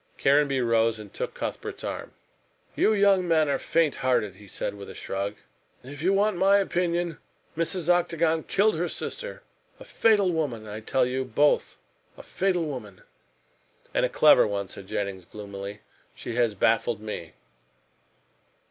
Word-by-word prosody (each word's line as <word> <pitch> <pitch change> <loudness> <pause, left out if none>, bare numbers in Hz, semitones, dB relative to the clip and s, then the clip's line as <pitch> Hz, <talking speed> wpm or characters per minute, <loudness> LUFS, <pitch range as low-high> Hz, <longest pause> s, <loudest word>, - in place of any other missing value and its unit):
Caranby 140 -1 +3
rose 115 -1 +2
and 105 -2 -11
took - - -4
Cuthbert's - - -5
arm. - - -5 0.6
"You - - +3
young 200 -3 +3
men 160 -2 +3
are 140 - 0
faint 165 -3 +1
hearted," 115 -7 0
he 105 0 -14
said, - - -4
with 100 -1 -10
a - - -9
shrug. 100 +2 -4 0.5
"If 140 +3 -9
you 185 +4 +2
want 200 0 +2
my 195 +2 +5
opinion, 175 -3 -1 0.4
Mrs. 165 +1 -1
Octagon 170 -2 +2
killed 210 +1 +2
her 175 +2 -1
sister. - - -5 0.4
A - - -11
fatal 205 -5 +3
woman, 140 -10 -2
I 105 0 -6
tell 125 +4 +1
you 130 +1 -1
both 145 +3 +1 0.4
a - - -11
fatal 180 -3 0
woman." 110 -10 -7 0.9
"And - - +1
a - - +2
clever - - +6
one," 100 -2 -3
said 100 -1 -9
Jennings 95 -3 -3
gloomily, 100 0 -8 0.3
"she 120 - -6
has 115 -3 +1
baffled 115 +2 +2
me." 105 -7 -7
140 Hz, 155 wpm, -26 LUFS, 105-175 Hz, 0.9 s, clever